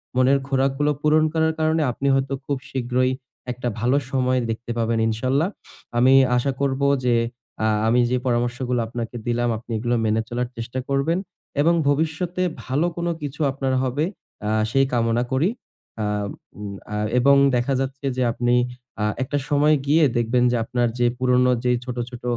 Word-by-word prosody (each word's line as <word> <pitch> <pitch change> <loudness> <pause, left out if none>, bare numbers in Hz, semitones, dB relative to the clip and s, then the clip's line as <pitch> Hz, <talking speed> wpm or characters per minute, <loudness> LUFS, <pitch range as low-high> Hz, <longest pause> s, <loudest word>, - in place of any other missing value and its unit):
মনের 130 +2 +4
খোরাকগুলো 135 +2 +1
পূরণ 155 +1 +4
করার 160 0 +2
কারণে 160 +1 +2
আপনি 140 +3 -3
হয়তো 135 0 0
খুব 140 -2 -1
শীঘ্রই 130 0 0 0.4
একটা 125 0 -4
ভালো 125 +5 +2
সময় 130 -1 +1
দেখতে 115 +1 -4
পাবেন, 115 0 +1
ইনশাআল্লাহ। 130 - +1 0.5
আমি 130 +2 +5 0.2
আশা 135 +3 +1
করব 135 -1 0 0.2
যে, 120 -1 +3 0.5
আ - - +3 0.2
আমি 120 +2 +3
যে 125 - +2
পরামর্শগুলো 120 0 0
আপনাকে 120 0 -5
দিলাম, 120 0 +1
আপনি 115 +1 -12
এগুলো 120 +2 0
মেনে 110 +1 +2
চলার 120 0 -2
চেষ্টা 120 +3 -4
করবেন। 140 +5 +1 0.4
এবং 170 +3 +4
ভবিষ্যতে 160 +5 0 0.2
ভালো 140 +6 0
কোন 170 0 -2
কিছু 145 +2 -5
আপনার 135 -1 -2
হবে, 130 +4 0 0.4
আ - - 0 0.2
সেই 135 0 +4
কামনা 115 0 +2
করি। 140 +9 +2 0.5
আ - - 0 0.5
উ - - -7 0.3
আ - - -2 0.2
এবং 140 +3 +5 0.2
দেখা 125 +3 +1
যাচ্ছে 135 +1 -4
যে 130 - +2
আপনি 120 +1 +1 0.5
আ - - +1 0.2
একটা 145 +3 -2
সময় 150 +1 +4
গিয়ে 155 +3 +4
দেখবেন 120 +1 +2
যে - - +1
আপনার 120 0 0
যে 120 - +3
পুরোনো 125 0 +3
যে 125 - +2
ছোট, 125 -1 -5
ছোট 125 -1 -10
130 Hz, 165 wpm, -23 LUFS, 120-140 Hz, 0.5 s, আমি